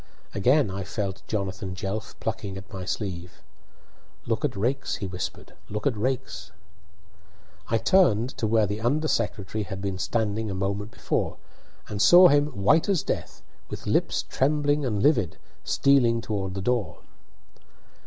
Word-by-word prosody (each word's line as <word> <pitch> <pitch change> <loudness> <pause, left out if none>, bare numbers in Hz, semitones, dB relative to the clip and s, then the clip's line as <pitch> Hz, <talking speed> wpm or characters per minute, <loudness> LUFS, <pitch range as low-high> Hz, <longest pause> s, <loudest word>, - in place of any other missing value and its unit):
Again 125 +3 +3
I 95 +1 -4
felt 100 0 -4
Jonathan 95 -2 -3
Jelf 100 +3 -5
plucking 105 -3 -4
at 95 0 -11
my 95 -1 -5
sleeve. 90 -3 -5 0.8
"Look - - -1
at - - 0
Raikes," 130 +7 -1
he - - -5
whispered; 90 -2 -6 0.2
"look 105 0 -4
at 135 - +2
Raikes!" 105 -6 -3 1.2
I 115 - +2
turned 120 - +3
to 110 - +1
where 110 0 +3
the 105 +2 -3
under 145 +7 +1
secretary 105 -4 -1
had 95 -1 -6
been 95 -1 -3
standing 110 +2 -1
a 95 - -3
moment 100 +2 -2
before, - - -2 0.5
and 105 -1 -3
saw 175 - +9
him, 145 +1 +4
white 150 - +2
as 190 -6 +2
death, - - -4 0.3
with - - -7
lips - - +1
trembling 145 +1 +1
and 105 -4 -1
livid, 120 - +2 0.3
stealing 125 -4 +3
toward 100 -4 -3
the 95 - -4
door. 120 -2 -1
105 Hz, 150 wpm, -26 LUFS, 95-130 Hz, 1.2 s, saw